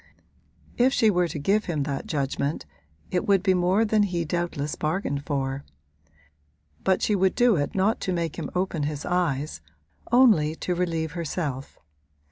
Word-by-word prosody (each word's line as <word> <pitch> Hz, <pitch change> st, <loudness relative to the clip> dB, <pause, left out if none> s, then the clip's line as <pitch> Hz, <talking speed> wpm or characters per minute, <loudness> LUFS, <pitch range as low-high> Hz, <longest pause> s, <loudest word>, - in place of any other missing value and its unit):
If 255 Hz, +2 st, +4 dB
she 220 Hz, -5 st, +4 dB
were 180 Hz, -2 st, +2 dB
to 160 Hz, -, -5 dB
give 200 Hz, +9 st, +1 dB
him 155 Hz, -5 st, -1 dB
that 140 Hz, -1 st, -4 dB
judgment 140 Hz, 0 st, -2 dB, 0.5 s
it 180 Hz, -, -1 dB
would 195 Hz, -2 st, +3 dB
be 190 Hz, -2 st, +4 dB
more 185 Hz, +5 st, +2 dB
than 215 Hz, 0 st, +2 dB
he 175 Hz, -4 st, 0 dB
doubtless 155 Hz, -3 st, -2 dB
bargained 155 Hz, -3 st, -2 dB
for; 135 Hz, -1 st, -2 dB, 1.2 s
but 190 Hz, -, +2 dB
she 210 Hz, -, +2 dB
would 190 Hz, -1 st, +2 dB
do 240 Hz, -3 st, +4 dB
it 145 Hz, -3 st, -2 dB
not 195 Hz, +4 st, +2 dB
to 185 Hz, -, -1 dB
make 170 Hz, -3 st, -2 dB
him -, -, -4 dB
open 180 Hz, -3 st, -1 dB
his 145 Hz, 0 st, -3 dB
eyes 155 Hz, -, -1 dB, 0.5 s
only 215 Hz, -12 st, +5 dB
to 180 Hz, -, -2 dB
relieve 165 Hz, -3 st, -1 dB
herself. 155 Hz, -5 st, -4 dB
175 Hz, 160 wpm, -25 LUFS, 145-190 Hz, 1.2 s, only